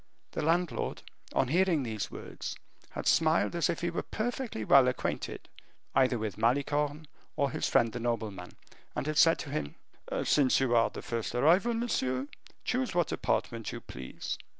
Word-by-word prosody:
The - - -3
landlord, 165 +2 0 0.3
on 130 - +2
hearing 170 -2 +3
these 110 -4 -3
words, - - -7 0.3
had - - -6
smiled 165 +1 +3
as 170 +1 +2
if 170 - -1
he 170 0 0
were 170 - -2
perfectly 235 - -3
well 135 +2 +7
acquainted 125 - -3 0.5
either 130 -2 +3
with 110 -2 -4
Malicorne 145 +5 +1 0.3
or 140 -1 +1
his - - -1
friend 115 -2 +3
the 120 - -3
nobleman, 110 -6 -3 0.4
and - - -2
had 155 0 +1
said 165 0 +6
to 140 - -6
him, 105 - -3 0.5
"Since 135 -4 +4
you 130 -3 +2
are 115 - +4
the - - -8
first 115 0 -3
arrival, 180 - +4
monsieur, 130 - 0 0.4
choose 250 -5 -1
what 175 -3 +2
apartment 115 -2 -1
you - - -5
please." 65 +1 -6
140 Hz, 165 wpm, -30 LUFS, 115-170 Hz, 0.5 s, well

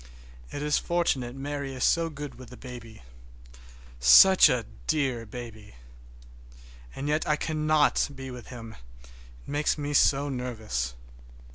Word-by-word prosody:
It 145 - -5
is 150 0 +1
fortunate 135 -8 -1
Mary 140 0 -5
is 125 - -3
so 165 -1 +2
good 145 -2 -8
with 130 -1 -13
the 125 - -12
baby. 120 - -11 1.0
Such 150 - +8
a 125 -4 0 0.2
dear 130 -6 -1
baby! 110 - -10 1.2
And 140 - -5
yet 150 +1 0
I 150 - +4
cannot 155 -1 +1
be 135 -1 -8
with 125 -1 -10
him, 115 -3 -10 0.3
it - - -17 0.4
makes 145 +2 0
me 145 0 -4
so 140 0 +3
nervous. 110 - -4
135 Hz, 135 wpm, -27 LUFS, 120-150 Hz, 1.2 s, Such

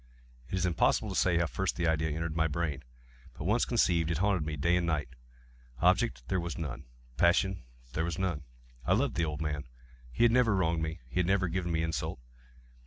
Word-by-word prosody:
It - - -2
is 95 0 +1
impossible 90 -2 +2
to - - -4
say 90 -2 +3
how 85 - +2
first 95 +4 -2
the 85 - -1
idea 80 0 +1
entered 80 +1 -3
my 80 0 +2
brain; 75 -3 -2 0.5
but - - -6
once 105 +8 +2
conceived, 85 -9 +2
it 85 - 0
haunted 95 -2 +2
me 75 0 -3
day 85 +5 +2
and 90 -1 +1
night. 75 -5 0 0.7
Object - - +2
there 95 - 0
was 85 0 -4
none. 70 -5 -5 0.3
Passion 90 +2 +3 0.3
there 80 - 0
was 85 -2 -3
none. 90 -5 -1 0.4
I 90 - +2
loved 120 +5 +1
the 85 - +1
old 75 0 -4
man. 75 -3 -3 0.4
He 90 - +1
had 120 - +6
never 115 -4 +4
wronged 85 -3 +1
me. 80 -2 -3
He 60 - -3
had 90 - +2
never 95 -1 +2
given 85 0 -2
me 80 0 +1
insult. 80 -5 -2
85 Hz, 210 wpm, -31 LUFS, 80-95 Hz, 0.7 s, had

